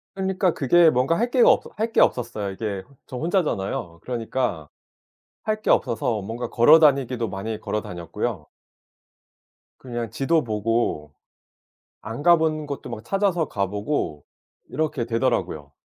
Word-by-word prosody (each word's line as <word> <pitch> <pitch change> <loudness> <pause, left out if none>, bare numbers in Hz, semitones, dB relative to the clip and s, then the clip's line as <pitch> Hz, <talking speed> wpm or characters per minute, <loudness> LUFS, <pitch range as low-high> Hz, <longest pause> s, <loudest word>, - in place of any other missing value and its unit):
그러니까 190 -2 0
그게 165 +4 +5
뭔가 130 +5 +1
할 240 +2 +1
게가 245 -1 +5
없어 - - 0
할 225 +2 -2
게 - - +2
없었어요. 110 -5 +1
이게 100 -1 -4
어 140 - -22
저 130 - -7
혼자잖아요. 115 - -1
그러니까 115 - -3 0.7
할 215 0 -1
게 - - -3
없어서 115 -3 +1
뭔가 115 +5 -5
걸어 150 +7 +6
다니기도 130 -6 +2
많이 100 +3 -4
걸어 105 -1 -2
다녔고요. 85 +1 -5 1.3
그냥 120 -3 -5
지도 155 +6 +1
보고 105 -9 -1 0.9
안 115 +5 -6
가 175 +2 +7
본 155 -1 -1
곳도 140 -3 -6
막 110 -1 -7
찾아서 190 -2 +1
가 100 -1 -1
보고 100 - -3 0.4
이렇게 150 -5 -2
되더라고요. 115 - -1
120 Hz, 300 characters per minute, -23 LUFS, 105-155 Hz, 1.3 s, 가